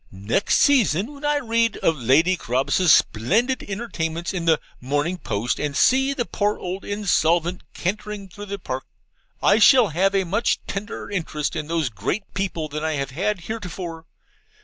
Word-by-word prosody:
Next 100 - 0
season, 235 - +3
when 285 +1 -13
I 295 0 +2
read 230 -4 +1
of 165 - +1
Lady 150 +8 +3
Carabas's 135 +5 +1
splendid 220 - +2
entertainments 175 -5 -4
in 175 -3 -3
the 160 -2 +4 0.2
MORNING 145 +7 -1
POST, 110 -2 -2
and 145 -1 -2
see 265 +2 +4
the 240 - -1
poor 205 -1 -1
old 185 +2 -5
insolvent 180 -4 +1
cantering 205 +1 -4
through 205 +2 -10
the 200 +1 -4
Park 130 -7 -5 0.6
I 200 - +5
shall 240 -1 +6
have 190 +5 +1
a 195 - +3
much 205 +6 0
tenderer 200 +1 -6
interest 155 -6 -2
in 150 - -3
these 165 -4 0
great 110 - -3
people 185 -5 -2
than 150 +1 -5
I 160 0 0
have 140 -2 -3
had 190 +6 -1
heretofore. 175 -5 -6
180 Hz, 165 wpm, -23 LUFS, 155-210 Hz, 0.6 s, shall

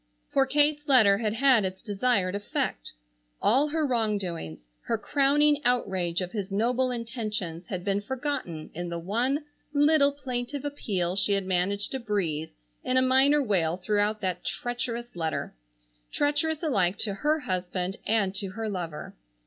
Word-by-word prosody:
For 270 -1 +3
Kate's 295 +2 +2
letter 220 -8 +6
had 215 -2 0
had 255 -3 +5
its 190 0 -3
desired 205 -3 0
effect. 200 - -3 0.5
All 270 +7 +3
her 310 +1 0
wrongdoings, 200 - -2 0.2
her 230 - 0
crowning 290 +4 +3
outrage 190 -9 +1
of 180 -1 -4
his 200 -3 -4
noble 245 +5 +1
intentions, 215 -8 -4
had 180 -2 -4
been 200 0 0
forgotten 245 - -4
in 175 +2 -4
the 170 - -3
one 240 - 0 0.3
little 290 0 +4
plaintive 265 0 -4
appeal 190 -11 -2
she 200 +1 +2
had 195 -1 0
managed 190 +2 0
to 265 - -2
breathe 175 -9 -2 0.3
in 255 - +1
a - - +5
minor 270 +3 +5
wail 175 -7 +1
throughout 210 +2 0
that 180 -2 -2
treacherous 240 -1 -3
letter, 160 -2 -3 0.6
treacherous 295 +2 0
alike 195 - +1
to 205 - -1
her 300 +9 0
husband 185 -1 -2
and 205 -3 +2
to 195 0 -2
her 225 +1 -4
lover. 170 -7 -5
215 Hz, 150 wpm, -27 LUFS, 185-265 Hz, 0.6 s, letter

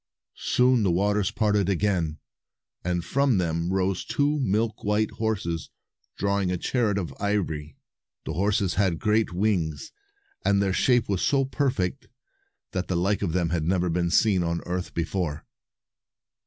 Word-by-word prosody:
Soon 125 -1 +3
the 100 - +2
waters 100 +3 +1
parted 105 -4 +1
again, 90 -5 0 0.7
and 90 -1 -1
from 135 +2 +2
them 85 0 -1
rose 95 -1 0
two 145 +1 0
milk 110 -2 0
white 105 +1 +1
horses 95 -7 -2 0.5
drawing 100 -2 0
a 90 - 0
chariot 110 +1 0
of 90 -5 -3
ivory. 85 -8 -2 0.5
The 80 - -3
horses 100 +1 +1
had 90 -2 +1
great 110 +3 +1
wings, 90 -5 -1 0.5
and 100 0 +3
their 100 -1 +1
shape 120 +3 +3
was 100 -3 -1
so 140 -2 +2
perfect 130 -4 -1 0.6
that 95 -1 -2
the 90 - 0
like 95 +4 +1
of 90 -6 -1
them 85 -2 0
had 85 -2 0
never 90 +1 +1
been 85 0 0
seen 100 0 +3
on 85 0 -1
earth 90 0 -4
before. 85 -3 -2
95 Hz, 150 wpm, -26 LUFS, 85-105 Hz, 0.7 s, Soon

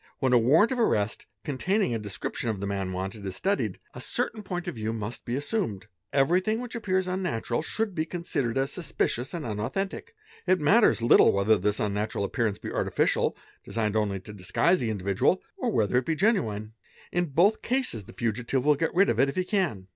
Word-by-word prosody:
When 130 -2 +1
a 120 - +7
warrant 155 - +4
of 255 - -1
arrest, 110 - +1 0.2
containing 175 - 0
a 115 - -1
description 105 +3 -4
of 105 -3 -2
the 100 - -3
"man 100 -2 -2
wanted," 95 +3 -5
is 95 -1 -4
studied, 195 - -1 0.2
a - - -8
certain 220 - -2
point 180 -3 -5
of - - -2
view 110 -1 -3
must 110 +1 -5
be 120 - -2
assumed; 145 - -2 0.3
everything 180 +10 +2
'which 245 -1 -6
appears 190 -5 0
unnatural 180 -11 -1
should 215 +5 -2
be 160 -2 -2
considered 150 -9 -2
as 135 +1 0
suspicious 135 -7 -2
and 170 -4 -5
unau 110 +2 -3
thentic; 195 - -3 0.4
it 185 +1 +4
matters 175 - +4
little 120 - +7
whether 100 +3 +3
this 105 +1 0
unnatural 105 0 -1
appearance 110 -1 -1
be - - -7
artificial, - - +1 0.3
designed 110 -2 -2
only 100 -3 0
to 105 - -10
disguise 105 - +1
the 120 - -1
individual, 100 -2 +1 0.2
or - - -1
whether 110 +3 +2
it 130 - -6
be 160 - +1
genuine. 110 - 0 0.4
In 175 0 0
both 175 +9 +3
cases, 245 - -1
the - - -12
fugitive 120 +3 -1
will 150 - +6
get 160 +4 -1
rid 195 +2 +5
of - - 0
it 140 - +4
if - - -5
he 185 - +1
can. 180 - -1
130 Hz, 200 wpm, -27 LUFS, -, 0.4 s, a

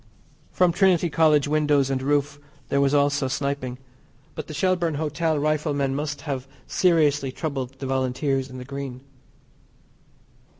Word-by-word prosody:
From 180 -1 +3
Trinity 175 -2 +3
College 150 -2 +4
windows 145 -2 +2
and 130 -1 -1
roof 145 +1 0 0.3
there 140 - +2
was 140 -1 +3
also 140 -1 +2
sniping, 135 -2 -3 0.6
but - - -6
the 155 - -7
Shelbourne 175 -1 +1
Hotel 155 +1 -1
riflemen 145 -2 0
must 145 +1 -3
have 135 -4 -4 0.2
seriously 150 -6 +2
troubled 135 -3 -4
the 135 - -6
Volunteers 130 +1 -1
in 130 - -9
the 125 - -8
Green. 135 -2 -6
145 Hz, 135 wpm, -24 LUFS, 135-155 Hz, 0.6 s, College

